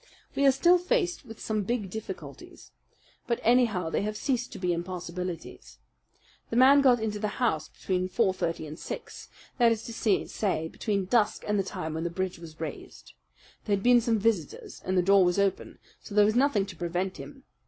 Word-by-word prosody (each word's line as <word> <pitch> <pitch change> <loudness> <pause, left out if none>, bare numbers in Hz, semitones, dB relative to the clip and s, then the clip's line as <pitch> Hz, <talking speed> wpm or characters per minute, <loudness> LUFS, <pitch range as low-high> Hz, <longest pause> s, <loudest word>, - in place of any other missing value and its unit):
We 280 - +3
are - - +8
still 345 +7 +4
faced 360 - 0
with 225 -2 -11
some 215 -1 -1
big 205 -2 -2
difficulties; 220 +1 -9 0.6
but 235 - 0
anyhow 220 -8 +2
they - - 0
have 210 +1 -3
ceased 250 -1 -1
to - - -8
be 180 -2 0
impossibilities. 175 0 -6 0.7
The - - -3
man 270 +3 +7
got 250 -3 +5
into 215 -1 -2
the 210 -1 -3
house 195 -12 0
between 185 -1 -2
four 190 0 +1
thirty 165 -3 -3
and 155 +2 -9
six; - - -8 0.3
that 235 -1 +5
is 225 -1 -1
to 230 - -7
say, 200 -5 0
between 200 -1 -2
dusk 215 +1 +1
and 210 -1 +1
the - - +1
time 160 -4 -5
when 160 +1 -3
the 170 - -1
bridge 185 0 -3
was 160 -2 -12
raised. 160 -3 -8 0.5
There 205 - +2
had 195 - -5
been 245 -1 +6
some 230 -1 +1
visitors, 205 -7 -2
and 185 0 -1
the 180 - +4
door 195 +1 +5
was 180 +1 +1
open; 200 -1 -1 0.2
so 205 - -10
there 210 -1 +6
was 215 - +2
nothing 245 -5 +2
to 195 -3 -10
prevent 175 +2 -3
him. 270 -2 -11
205 Hz, 195 wpm, -28 LUFS, 180-235 Hz, 0.7 s, are